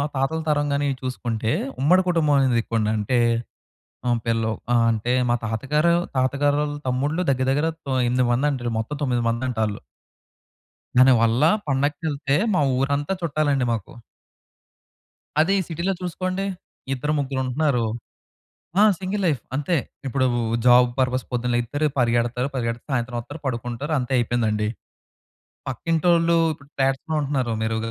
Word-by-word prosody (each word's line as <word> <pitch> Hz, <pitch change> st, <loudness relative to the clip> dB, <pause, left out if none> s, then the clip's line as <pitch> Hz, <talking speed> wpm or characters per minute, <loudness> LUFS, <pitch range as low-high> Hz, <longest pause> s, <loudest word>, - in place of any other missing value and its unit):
తాతల 135 Hz, +5 st, 0 dB
తరం 145 Hz, -1 st, +1 dB
గాని 140 Hz, +1 st, 0 dB
ఇవి 135 Hz, -, -1 dB
చూసుకుంటే, 115 Hz, -3 st, -2 dB, 0.3 s
ఉమ్మడి 180 Hz, +7 st, +5 dB
కుటుంబం 160 Hz, -4 st, +2 dB
అనేది 125 Hz, -3 st, +3 dB
ఎక్కువండి. 110 Hz, -2 st, -1 dB
అంటే 110 Hz, +4 st, 0 dB, 0.9 s
హ్మ్. 120 Hz, -1 st, +2 dB
పిల్లలు 115 Hz, -1 st, +1 dB, 0.2 s
ఆహ్, 120 Hz, -1 st, +4 dB
అంటే 115 Hz, +3 st, -1 dB, 0.2 s
మా 120 Hz, -, +4 dB
తాతగారు, 150 Hz, +9 st, +1 dB, 0.2 s
తాతగారోళ్ళ 145 Hz, +3 st, +1 dB
తమ్ముళ్ళు 145 Hz, +7 st, 0 dB
దగ్గర 130 Hz, -1 st, +1 dB
దగ్గర 145 Hz, +4 st, +1 dB, 0.2 s
తో 135 Hz, -, -2 dB, 0.2 s
ఎనిమిది 125 Hz, +1 st, +2 dB
మంది 135 Hz, +5 st, +2 dB
అంటారు. 120 Hz, -4 st, -3 dB
మొత్తం 130 Hz, +7 st, -5 dB
తొమ్మిది 125 Hz, -4 st, +1 dB
మందంటాల్లు... 115 Hz, -3 st, -1 dB, 1.2 s
దానివల్ల 120 Hz, -1 st, +5 dB, 0.2 s
పండగకేళ్తే 145 Hz, 0 st, 0 dB, 0.2 s
మా 185 Hz, -, +3 dB, 0.2 s
ఊరంతా 140 Hz, +5 st, 0 dB
చుట్టాలండి 145 Hz, -5 st, +1 dB
మాకు. 110 Hz, -4 st, -4 dB, 1.5 s
అదే 170 Hz, +5 st, +3 dB
ఈ -, -, 0 dB
సిటీ‌లో 170 Hz, +3 st, -1 dB
చూసుకోండి. 185 Hz, +2 st, -2 dB, 0.5 s
ఇద్దరు, 150 Hz, +4 st, -2 dB
ముగ్గురు 135 Hz, -2 st, -2 dB
ఉంటున్నారు. 130 Hz, -2 st, +1 dB, 1.0 s
ఆ! -, -, +8 dB, 0.2 s
సింగిల్ 195 Hz, +1 st, -2 dB
లైఫ్ 145 Hz, -8 st, 0 dB
అంతే. 150 Hz, +4 st, 0 dB, 0.3 s
ఇప్పుడు 130 Hz, +1 st, +1 dB, 0.4 s
జాబ్ 125 Hz, 0 st, +7 dB
పర్పస్ 130 Hz, 0 st, +1 dB
పొద్దున్నే 125 Hz, 0 st, -1 dB
లెగిత్తారు 145 Hz, +6 st, 0 dB
పరిగెడతారు 120 Hz, +1 st, +1 dB
పరిగెడితే 115 Hz, -2 st, -3 dB
సాయంత్రం 120 Hz, -1 st, -1 dB
ఒత్తారు 145 Hz, +6 st, -10 dB
పడుకుంటారు 120 Hz, +4 st, -3 dB
అంతే 125 Hz, +1 st, -3 dB
అయిపేందండి. 110 Hz, -3 st, 0 dB, 1.0 s
పక్కింటోళ్ళు 165 Hz, 0 st, +2 dB, 0.2 s
ఇప్పుడు 140 Hz, 0 st, -20 dB
ఫ్లాట్స్‌లో 135 Hz, +3 st, 0 dB
ఉంటున్నారు. 135 Hz, -4 st, -1 dB
మీరు 110 Hz, 0 st, 0 dB
130 Hz, 130 wpm, -23 LUFS, 120-150 Hz, 1.5 s, ఆ